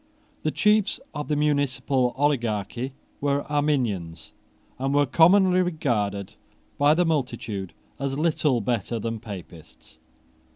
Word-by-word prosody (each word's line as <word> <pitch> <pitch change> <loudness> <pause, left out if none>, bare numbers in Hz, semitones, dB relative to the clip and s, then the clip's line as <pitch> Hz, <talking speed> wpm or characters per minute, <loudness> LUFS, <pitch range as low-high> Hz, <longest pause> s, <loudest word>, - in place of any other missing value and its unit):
The 155 - 0
chiefs 210 +4 +2
of 150 -1 -4
the 150 - 0
municipal 135 -3 +1
oligarchy 125 -3 -1 0.3
were 140 0 +1
Arminians, 110 - -1 0.5
and 135 +2 0
were 145 0 +4
commonly 185 +5 +5
regarded 110 - -1 0.5
by 145 +2 +5
the 175 +1 +2
multitude 120 - -2 0.2
as 140 -1 -2
little 150 -5 +1
better 115 +1 -1
than 115 0 -3
Papists. 90 -7 -11
135 Hz, 115 wpm, -25 LUFS, 110-150 Hz, 0.5 s, commonly